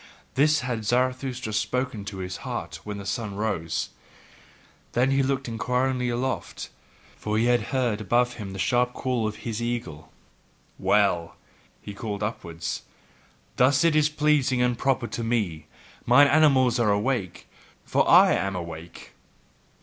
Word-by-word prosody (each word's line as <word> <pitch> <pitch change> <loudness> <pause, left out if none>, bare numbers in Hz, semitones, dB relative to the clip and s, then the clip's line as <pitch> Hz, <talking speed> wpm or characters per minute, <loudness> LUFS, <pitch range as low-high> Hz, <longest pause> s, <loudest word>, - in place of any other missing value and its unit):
This 150 +3 +3
had 120 -3 -3
Zarathustra 125 0 -1
spoken 125 -1 -2
to 100 -1 -6
his 90 -1 -5
heart - - -5
when 105 -1 -5
the 100 - -8
sun 105 0 -3
arose: 100 -7 -2 1.0
then 130 +3 +2
looked 135 0 -1
he 120 - -5
inquiringly 125 +2 0
aloft, 125 +2 -3 0.4
for 105 0 -2
he 115 - +2
heard 120 -2 -1
above 120 +4 +1
him 105 -5 -7
the 95 - -7
sharp 125 +6 +1
call 125 -4 -1
of 110 - -4
his 115 -1 -3
eagle. 90 -11 -4 0.7
"Well!" 100 -5 +2 0.6
called 105 -1 -5
he - - +2
upwards, 85 -6 -5 0.8
"thus 130 +4 +4
is 155 -2 +4
it 155 - -20
pleasing 145 -4 +2
and 125 0 +2
proper 130 0 0
to 115 - -4
me. 105 -10 -1 0.4
Mine 125 +4 +7
animals 135 -5 +4
are 115 -3 +3
awake, 105 -1 -1 0.4
for - - +1
I - - +7
am 95 0 -1
awake. 85 -1 -8
120 Hz, 140 wpm, -25 LUFS, 100-130 Hz, 1.0 s, Mine